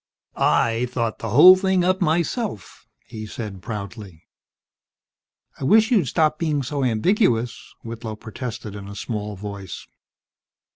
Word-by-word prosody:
"I 115 Hz, +2 st, +2 dB
thought 115 Hz, -3 st, -3 dB
the 115 Hz, -, -4 dB
whole 155 Hz, -, +9 dB
thing 190 Hz, -1 st, +1 dB
up, 185 Hz, +1 st, +1 dB
myself," 170 Hz, -, -2 dB, 0.2 s
he 110 Hz, -1 st, -8 dB
said, 105 Hz, -4 st, -7 dB
proudly. 100 Hz, -5 st, -8 dB, 1.4 s
"I -, -, -6 dB
wish 220 Hz, -, +4 dB
you'd 200 Hz, -, +3 dB
stop 155 Hz, +4 st, +1 dB
being 150 Hz, -4 st, 0 dB
so 140 Hz, +2 st, -3 dB
ambiguous," 125 Hz, -, 0 dB
Whitlow 115 Hz, -1 st, -6 dB
protested 110 Hz, -1 st, -7 dB
in 100 Hz, -1 st, -8 dB
a 100 Hz, -, -9 dB
small 105 Hz, 0 st, -4 dB
voice. 100 Hz, -1 st, -8 dB
115 Hz, 130 wpm, -22 LUFS, 105-160 Hz, 1.4 s, whole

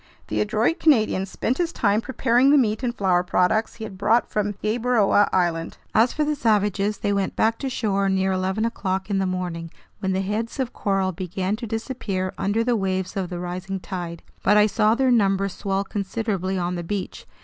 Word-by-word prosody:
The -, -, 0 dB
adroit 220 Hz, -, +1 dB
Canadian 220 Hz, -, +3 dB
spent 240 Hz, -, -2 dB
his 340 Hz, -1 st, 0 dB
time 210 Hz, -7 st, +1 dB
preparing 250 Hz, +1 st, +2 dB
the 295 Hz, -, +6 dB
meat 220 Hz, -4 st, +2 dB
and 245 Hz, -2 st, -2 dB
flour 185 Hz, -3 st, +3 dB
products 180 Hz, +5 st, +1 dB
he 225 Hz, -, -8 dB
had 190 Hz, -3 st, -8 dB
brought 220 Hz, +4 st, +3 dB
from 210 Hz, 0 st, -1 dB
Gueboroa 215 Hz, -1 st, +2 dB
Island. 170 Hz, -2 st, 0 dB, 0.2 s
As 230 Hz, +3 st, +4 dB
for 305 Hz, -, 0 dB
the 300 Hz, 0 st, 0 dB
savages, 210 Hz, -4 st, +1 dB
they 205 Hz, -, -1 dB
went 200 Hz, -1 st, -1 dB
back 225 Hz, +1 st, +1 dB
to 270 Hz, -, -2 dB
shore 200 Hz, -5 st, 0 dB
near 190 Hz, 0 st, +1 dB
eleven 190 Hz, +3 st, 0 dB
o'clock 190 Hz, -3 st, -2 dB
in 195 Hz, -, +1 dB
the 190 Hz, -, 0 dB
morning, 175 Hz, -2 st, -3 dB, 0.3 s
when 190 Hz, -, -1 dB
the 190 Hz, -, 0 dB
heads 215 Hz, +6 st, -3 dB
of 255 Hz, -2 st, -2 dB
coral 195 Hz, -2 st, 0 dB
began 185 Hz, +3 st, -3 dB
to 235 Hz, 0 st, -6 dB
disappear 215 Hz, -5 st, -3 dB
under 205 Hz, +4 st, +1 dB
the 240 Hz, 0 st, +1 dB
waves 190 Hz, -2 st, -2 dB
of 190 Hz, -3 st, -2 dB
the 180 Hz, -, -5 dB
rising 180 Hz, +2 st, -4 dB
tide. 175 Hz, -3 st, -6 dB, 0.2 s
But 205 Hz, +2 st, +4 dB
I 210 Hz, -, +6 dB
saw 215 Hz, +1 st, +2 dB
their 260 Hz, 0 st, +2 dB
numbers 195 Hz, -4 st, +2 dB
swell 195 Hz, -1 st, -1 dB
considerably 195 Hz, -2 st, -2 dB
on 175 Hz, 0 st, -1 dB
the 175 Hz, -1 st, -4 dB
beach. 195 Hz, +2 st, -5 dB
200 Hz, 200 wpm, -23 LUFS, 190-225 Hz, 0.3 s, the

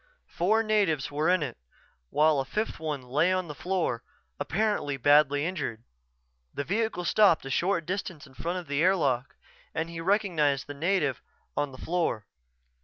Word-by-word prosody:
Four 215 Hz, +6 st, +1 dB
natives 200 Hz, -11 st, +1 dB
were 150 Hz, +3 st, +1 dB
in 180 Hz, -3 st, +3 dB
it 130 Hz, -5 st, -6 dB, 0.5 s
while 155 Hz, -1 st, +3 dB
a 135 Hz, -, -1 dB
fifth 215 Hz, +10 st, -3 dB
one 150 Hz, -4 st, -3 dB
lay 145 Hz, +8 st, +2 dB
on 185 Hz, -1 st, 0 dB
the 150 Hz, -, -6 dB
floor, 175 Hz, -8 st, -1 dB, 0.4 s
apparently 165 Hz, -3 st, 0 dB
badly 145 Hz, +2 st, +4 dB
injured. 135 Hz, -11 st, -3 dB, 0.7 s
The -, -, -2 dB
vehicle 205 Hz, 0 st, -1 dB
stopped 195 Hz, -6 st, +4 dB
a 135 Hz, -, -5 dB
short 170 Hz, +3 st, +1 dB
distance 180 Hz, -4 st, -4 dB
in 135 Hz, -, -17 dB
front 170 Hz, +6 st, -3 dB
of 180 Hz, -, -5 dB
the 145 Hz, 0 st, -1 dB
airlock 145 Hz, -9 st, +2 dB, 0.4 s
and 165 Hz, +1 st, -2 dB
he 165 Hz, -1 st, -5 dB
recognized 165 Hz, -8 st, +1 dB
the 145 Hz, -, -7 dB
native 155 Hz, -2 st, 0 dB, 0.3 s
on 145 Hz, -1 st, -1 dB
the 130 Hz, -, -11 dB
floor. 165 Hz, -, -1 dB
160 Hz, 165 wpm, -28 LUFS, 145-185 Hz, 0.7 s, badly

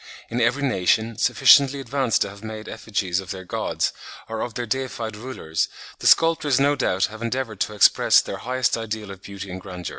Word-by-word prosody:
In 120 Hz, +1 st, -1 dB
every 120 Hz, +5 st, +1 dB
nation 110 Hz, -1 st, +1 dB
sufficiently 140 Hz, -1 st, +5 dB
advanced 130 Hz, -2 st, 0 dB
to -, -, -6 dB
have 100 Hz, +1 st, -14 dB
made 110 Hz, -1 st, -7 dB
effigies 100 Hz, -5 st, -2 dB
of 95 Hz, -2 st, -8 dB
their 95 Hz, -1 st, -6 dB
gods -, -, -2 dB, 0.3 s
or 110 Hz, 0 st, -4 dB
of 120 Hz, -, -5 dB
their 120 Hz, -, -3 dB
deified 120 Hz, -3 st, -3 dB
rulers, 105 Hz, -9 st, -3 dB, 0.3 s
the -, -, -1 dB
sculptors 160 Hz, -5 st, +4 dB
no 145 Hz, +1 st, +3 dB
doubt 95 Hz, -8 st, +1 dB
have 110 Hz, -, -10 dB
endeavoured 115 Hz, -3 st, -3 dB
to 105 Hz, -, -2 dB
express 105 Hz, -, +5 dB
their -, -, -4 dB
highest 130 Hz, 0 st, 0 dB
ideal 110 Hz, -2 st, -5 dB
of 95 Hz, -1 st, -11 dB
beauty 100 Hz, -1 st, -8 dB
and 95 Hz, +1 st, -7 dB
grandeur. 90 Hz, -2 st, -7 dB
110 Hz, 190 wpm, -23 LUFS, 100-130 Hz, 0.3 s, sufficiently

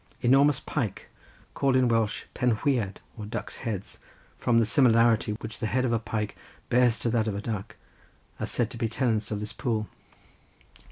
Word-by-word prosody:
Enormous 135 Hz, +3 st, +4 dB
pike, 115 Hz, -10 st, -3 dB, 0.4 s
called 135 Hz, -2 st, +1 dB
in 130 Hz, -1 st, +4 dB
Welsh 115 Hz, -2 st, +1 dB
penhwiaid, 120 Hz, -4 st, 0 dB, 0.2 s
or 105 Hz, -, -5 dB
ducks' 105 Hz, -, -5 dB
heads, 105 Hz, -6 st, -5 dB, 0.4 s
from 120 Hz, -2 st, +1 dB
the 115 Hz, -, +4 dB
similarity 115 Hz, -2 st, +4 dB
which 110 Hz, +1 st, -6 dB
the 110 Hz, -, -1 dB
head 130 Hz, +5 st, +1 dB
of 120 Hz, -, +1 dB
a 115 Hz, -, +2 dB
pike 110 Hz, -1 st, -3 dB, 0.3 s
bears 120 Hz, -2 st, +4 dB
to 115 Hz, -, -1 dB
that 115 Hz, -2 st, +1 dB
of 105 Hz, -, -1 dB
a -, -, -3 dB
duck, 105 Hz, -3 st, -5 dB, 0.6 s
are -, -, -2 dB
said 120 Hz, 0 st, 0 dB
to 120 Hz, -, -7 dB
be 115 Hz, -1 st, -1 dB
tenants 110 Hz, -3 st, 0 dB
of 105 Hz, -, -2 dB
this 105 Hz, -1 st, -5 dB
pool. 110 Hz, -2 st, -2 dB
115 Hz, 175 wpm, -27 LUFS, 105-125 Hz, 0.6 s, Enormous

